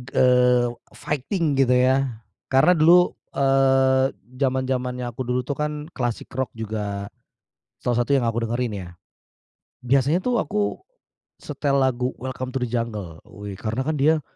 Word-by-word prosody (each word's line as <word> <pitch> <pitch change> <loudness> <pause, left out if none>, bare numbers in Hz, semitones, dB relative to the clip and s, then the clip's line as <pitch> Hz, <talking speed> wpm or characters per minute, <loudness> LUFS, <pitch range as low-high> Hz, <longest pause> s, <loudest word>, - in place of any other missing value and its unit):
eee, 125 -1 +4 0.3
fighting 150 +1 -1
gitu 125 -2 +4
ya. 130 -2 +2 0.3
Karena 135 +7 +5
dulu, 175 +3 +6 0.2
eee, 135 -1 +3 0.3
zaman-zamannya 130 -1 -1
aku 120 +3 -7
dulu 125 +1 0
tuh 140 - -3
kan 150 0 -3
klasik 120 -2 -3
rock 130 -1 -1
juga, 105 -2 -4 0.8
salah 120 -1 0
satu 140 - -2
yang 130 -3 +2
aku 115 +1 -1
dengerin 120 -1 -2
ya. 90 -2 -7 1.0
Biasanya 140 +7 +2
tuh 245 -2 +1
aku 210 - -2 0.6
setel 140 -1 -1
lagu 130 -1 0
Welcome 130 0 -5
to 125 - -1
the 125 - 0
Jungle, 105 -9 -4
wih 100 -1 -8
karena 110 +5 -2
kan 155 -1 0
dia 155 +2 +3
130 Hz, 140 wpm, -23 LUFS, 120-140 Hz, 1.0 s, dulu